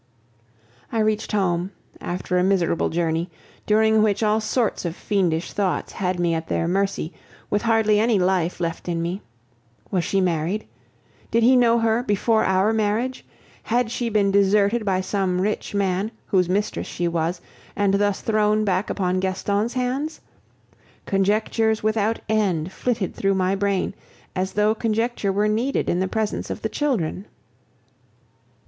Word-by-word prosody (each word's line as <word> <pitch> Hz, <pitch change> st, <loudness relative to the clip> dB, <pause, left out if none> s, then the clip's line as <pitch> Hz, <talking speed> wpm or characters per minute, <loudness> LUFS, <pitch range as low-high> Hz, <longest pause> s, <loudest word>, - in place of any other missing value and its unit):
I -, -, -2 dB
reached 215 Hz, 0 st, 0 dB
home, 185 Hz, -2 st, 0 dB, 0.3 s
after 180 Hz, +1 st, -3 dB
a -, -, +2 dB
miserable 185 Hz, -3 st, +1 dB
journey, 165 Hz, +1 st, -1 dB, 0.4 s
during 220 Hz, 0 st, +4 dB
which 210 Hz, 0 st, +1 dB
all 215 Hz, +1 st, +2 dB
sorts 225 Hz, +1 st, 0 dB
of 170 Hz, -2 st, -3 dB
fiendish 180 Hz, -6 st, -1 dB
thoughts 195 Hz, -3 st, -1 dB
had 185 Hz, -2 st, -2 dB
me 170 Hz, -1 st, +1 dB
at 160 Hz, 0 st, -3 dB
their 165 Hz, -, 0 dB
mercy, 190 Hz, -2 st, -1 dB, 0.4 s
with 205 Hz, -, +1 dB
hardly 220 Hz, -2 st, +3 dB
any 225 Hz, 0 st, +3 dB
life 180 Hz, -2 st, +1 dB
left 170 Hz, 0 st, -3 dB
in 170 Hz, -1 st, -1 dB
me. 175 Hz, +4 st, -3 dB, 0.7 s
Was 180 Hz, -3 st, +1 dB
she 195 Hz, -, 0 dB
married? 180 Hz, +2 st, 0 dB, 0.6 s
Did 230 Hz, +1 st, +2 dB
he 255 Hz, +3 st, +6 dB
know 235 Hz, -2 st, +4 dB
her 225 Hz, 0 st, +2 dB
before 220 Hz, 0 st, +1 dB
our 190 Hz, +3 st, +2 dB
marriage? 220 Hz, +4 st, -1 dB, 0.4 s
Had 235 Hz, 0 st, 0 dB
she 240 Hz, 0 st, -2 dB
been 205 Hz, -2 st, +2 dB
deserted 200 Hz, +3 st, +3 dB
by 190 Hz, -2 st, +1 dB
some 190 Hz, -2 st, -1 dB
rich 205 Hz, +1 st, -2 dB
man, 195 Hz, +1 st, 0 dB, 0.2 s
whose 180 Hz, -3 st, +1 dB
mistress 205 Hz, +3 st, -1 dB
she 175 Hz, -, -2 dB
was, 170 Hz, +1 st, -1 dB, 0.4 s
and 200 Hz, -1 st, +2 dB
thus 205 Hz, 0 st, +1 dB
thrown 215 Hz, -1 st, +2 dB
back 190 Hz, 0 st, 0 dB
upon 185 Hz, -1 st, 0 dB
Gaston's 200 Hz, +4 st, -1 dB
hands? 260 Hz, +5 st, -2 dB, 0.9 s
Conjectures 215 Hz, +3 st, +1 dB
without 215 Hz, +1 st, +1 dB
end 190 Hz, -6 st, 0 dB
flitted 220 Hz, -3 st, -2 dB
through 195 Hz, 0 st, 0 dB
my 185 Hz, 0 st, +1 dB
brain, 195 Hz, -1 st, 0 dB, 0.4 s
as 190 Hz, +1 st, -2 dB
though 210 Hz, +1 st, +3 dB
conjecture 225 Hz, -1 st, -1 dB
were 205 Hz, +2 st, +1 dB
needed 230 Hz, +6 st, 0 dB
in 175 Hz, -, +1 dB
the 190 Hz, -, 0 dB
presence 215 Hz, +2 st, -2 dB
of -, -, -5 dB
the 220 Hz, -, 0 dB
children. 215 Hz, -, -1 dB
200 Hz, 155 wpm, -23 LUFS, 185-220 Hz, 0.9 s, he